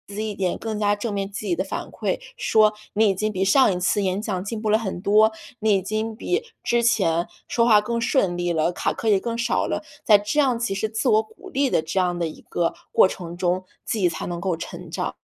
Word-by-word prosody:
己 215 +1 -2
一 205 - -5
点 185 -3 -1
更 220 -1 -4
加 205 0 +2
正 210 +1 -4
面 200 0 -3
积 210 0 -5
极 175 - +1
的 185 - -1
反 190 - -5
馈， - - -2 0.2
说： 215 - +4 0.2
“你 215 0 +4
已 195 - +1
经 215 +3 -1
比 190 -1 -1
上 195 +1 +5
一 180 - -3
次 190 +3 +1
演 190 +2 0
讲 190 -5 -3
进 215 +2 -5
步 215 - -1
了 215 - +5
很 190 -5 -4
多， 215 +3 +4 0.3
你 215 -1 +3
已 190 - +2
经 215 +3 -3
比 370 - -1 0.2
之 235 0 +1
前 175 -7 +2 0.2
说 230 - +2
话 215 -3 +6
更 235 +2 -2
顺 200 -7 +1
利 175 0 -1
了， 160 +2 +1
卡 - - -1
壳 225 - -5
也 205 - +5
更 230 +1 -3
少 235 +1 0
了。” - - -2 0.2
在 210 -2 +7
这 210 +9 -1
样 255 -5 +2
其 235 -5 -1
实 215 +3 -1
自 220 +3 -2
我 220 0 +4
鼓 220 0 -14
励 275 +1 +1
的 - - +3
这 170 +4 -2
样 175 -1 0
的 170 - 0
一 155 - -10
个 170 -1 -1 0.2
过 - - +6
程 175 -2 -7
中， 180 +1 0 0.2
自 225 - -2
己 185 -3 +3
才 170 - -4
能 175 -1 -4
够 180 0 -1
成 165 - -8
长。 - - -3
205 Hz, 275 characters per minute, -23 LUFS, 185-220 Hz, 0.3 s, 在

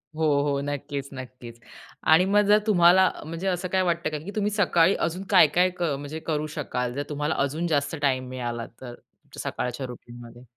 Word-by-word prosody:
हो, 160 0 +1 0.2
हो, 140 -1 0
नक्कीच, 140 -1 -4
नक्कीच 125 -2 -10 0.5
आणि 180 +3 +5
मग 205 +2 +4
जर 210 +1 +6
तुम्हाला 180 -1 +6
अ, - - -5
म्हणजे 165 +4 -5
असं 185 0 -1
काय 190 +1 +1
वाटतं 170 -3 0
का, 155 - -4
की 180 +7 -8
तुम्ही 210 0 0
सकाळी 190 -3 +3
अजून 175 +3 -2
काय-काय 180 -1 +5
क - - 0
म्हणजे 145 +3 -6
करू 155 -1 -1
शकाल? 125 -4 -3
जर 145 +2 -3
तुम्हाला 150 +1 -2
अजून 155 +5 -2
जास्त 145 -1 0
टाईम 130 -2 0
मिळाला 120 -2 -4 0.2
तर, 120 -2 -8 0.4
सकाळच्या 125 +2 -4
रुटीनमध्ये? 120 0 -12
150 Hz, 180 wpm, -25 LUFS, 130-175 Hz, 0.5 s, जर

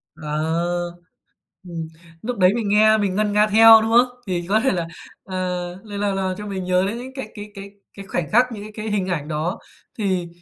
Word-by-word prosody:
Ờ, 170 +3 -2 0.7
ừm, 165 -3 -6 0.3
lúc 240 0 -4
đấy 185 +1 +5
mình 220 -4 -2
nghe 215 +1 +5
mình 195 -3 -1
ngân 210 0 +1
nga 210 +1 +4
theo, 225 +1 +8
đúng 225 +1 -1
không? 245 +2 +6 0.2
Thì 175 -2 -2
có 215 +2 +4
thể 265 - +2
là, 170 -3 -2 0.4
ờ, 185 - -7 0.5
lại 205 -2 -7
là 205 -1 0
là 190 -1 -1
cho 210 0 -7
mình 190 -2 -4
nhớ 180 +1 +2
đến 225 +4 -3
những 255 +2 -8
cái 265 - -6
cái 210 0 -9
cái 195 0 -9 0.2
cái 195 -1 -10
khoảnh 170 -5 -2
khắc, 245 +3 +5
những 205 -2 -7
cái 215 - -9
cái 215 0 -5
hình 195 -3 -1
ảnh 155 -5 -2
đó, 165 +7 -2 0.4
thì 185 -4 0
200 Hz, 220 wpm, -22 LUFS, 175-215 Hz, 0.7 s, theo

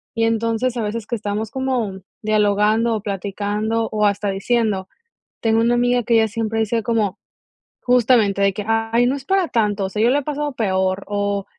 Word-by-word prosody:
y 225 - +2
entonces 230 +2 0
a 230 - -1
veces 215 +1 -4
que 235 - -2
estamos 210 0 -3
como, 245 -7 -2 0.2
dialogando 215 +2 +2
o 215 - -3
platicando 205 +3 -2
o 210 -1 +1
hasta 205 0 0
diciendo 195 -1 0 0.5
Tengo 225 0 +2
una 235 +1 +3
amiga 245 0 +2
que 235 +1 0
ella 225 -1 +5
siempre 225 0 -3
dice 225 +1 0
como, 215 -3 0 0.7
justamente, 235 -5 +3
de 200 0 +4
que: 200 +1 -6
"Ay 225 +2 +2
no 260 +3 +1
es 275 - -7
para 380 +3 +1
tanto, 210 -5 0
o - - -3
sea, 210 +2 -2
yo 240 - +4
le 275 - +3
he - - -4
pasado 295 +1 -3
peor", 190 -3 0
o: 205 -1 -1
220 Hz, 190 wpm, -20 LUFS, 205-235 Hz, 0.7 s, ella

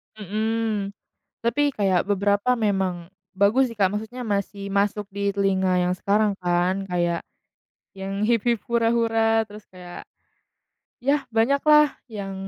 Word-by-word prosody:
Mhm, 215 0 -2 0.4
tapi 285 +5 +1
kayak 195 -6 +1
beberapa 205 +3 +1
memang 190 -5 -1 0.2
bagus 220 +6 +2
sih 225 - -11
Kak, 195 - +5
maksudnya 220 +5 -5
masih 200 0 -2
masuk 205 +1 0
di 200 0 -2
telinga 190 -2 +1
yang 180 0 +1
sekarang 205 +1 +1
kan 180 +2 +1
kayak, 175 -1 0 0.7
yang 195 +2 -3
"Hip-Hip 235 -1 +2
Hura-Hura" 225 -1 +2
terus 210 0 -12
kayak, 180 -1 -10 0.9
ya 280 +3 +1
banyaklah 280 +6 +4 0.2
yang 200 -3 -6
205 Hz, 120 wpm, -24 LUFS, 195-225 Hz, 0.9 s, Kak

